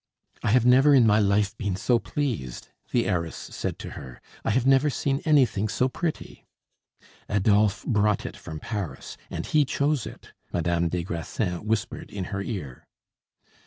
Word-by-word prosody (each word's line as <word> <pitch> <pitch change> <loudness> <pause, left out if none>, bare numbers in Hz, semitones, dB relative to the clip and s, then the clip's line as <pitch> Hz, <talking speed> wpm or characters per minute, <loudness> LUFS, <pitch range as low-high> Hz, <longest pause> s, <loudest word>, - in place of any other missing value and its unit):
"I - - 0
have 120 +2 +4
never 135 +4 +6
in 125 -3 +6
my 105 -1 +5
life 100 0 +2
been 100 -4 -1
so 120 +5 +2
pleased," 115 - -3 0.2
the - - +2
heiress 85 -3 -1
said - - -5
to - - -8
her; 65 -2 -9 0.2
"I - - -1
have 120 +3 +2
never 135 +2 +5
seen 135 0 -1
anything 130 -9 +3
so 125 +4 +1
pretty." 165 +4 -5 0.8
"Adolphe 105 -1 +2
brought 105 -3 +2
it - - -5
from 80 -1 -8
Paris, 105 -1 -5
and - - -4
he 155 -1 +3
chose 140 -2 0
it," - - -12 0.2
Madame 85 0 0
des 90 0 -2
Grassins 90 +2 -3
whispered 105 -1 -2
in 100 -2 -5
her 95 - -1
ear. 90 - -6
105 Hz, 160 wpm, -26 LUFS, 95-130 Hz, 0.8 s, never